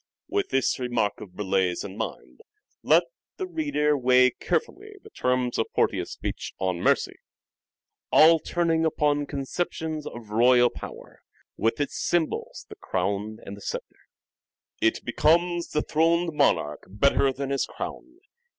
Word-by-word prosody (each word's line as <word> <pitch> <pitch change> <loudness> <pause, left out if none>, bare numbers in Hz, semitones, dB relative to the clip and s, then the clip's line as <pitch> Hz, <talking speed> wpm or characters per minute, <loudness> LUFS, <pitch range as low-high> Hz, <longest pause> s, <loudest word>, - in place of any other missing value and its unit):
With 405 0 -1
this 135 0 +1
remark 120 -5 -1
of 90 - -11
Burleigh's 95 -3 0
in 100 -1 -8
mind, 445 - -6 0.4
let - - +5 0.3
the 380 - -3
reader 290 - 0
weigh 130 -1 +4
carefully 400 - -3
the 435 - -14
terms 125 -1 0
of 115 - +1
Portia's - - +1
speech - - -5
on 95 -2 -1
" - - -7
Mercy," - - +1 0.9
all 165 +1 +7
turning 165 0 0
upon 145 -2 +1
conceptions 155 +2 -3
of 115 -3 -9
royal 120 +2 +5
power, - - -10 0.3
with 115 +3 0
its 145 - -2
symbols 170 -3 -1
the - - -12
crown 100 +4 -2
and 100 - -7
the 100 - -14
sceptre. - - -7 0.3
' - - -68
' - - -45
It 110 - +1
becomes 170 +7 +2
the 150 - -1
throned 165 +2 +1
monarch 85 - +1
better 135 +6 +2
than 135 +1 -4
his 140 - 0
crown. 330 +3 -8
140 Hz, 150 wpm, -26 LUFS, 110-165 Hz, 0.9 s, all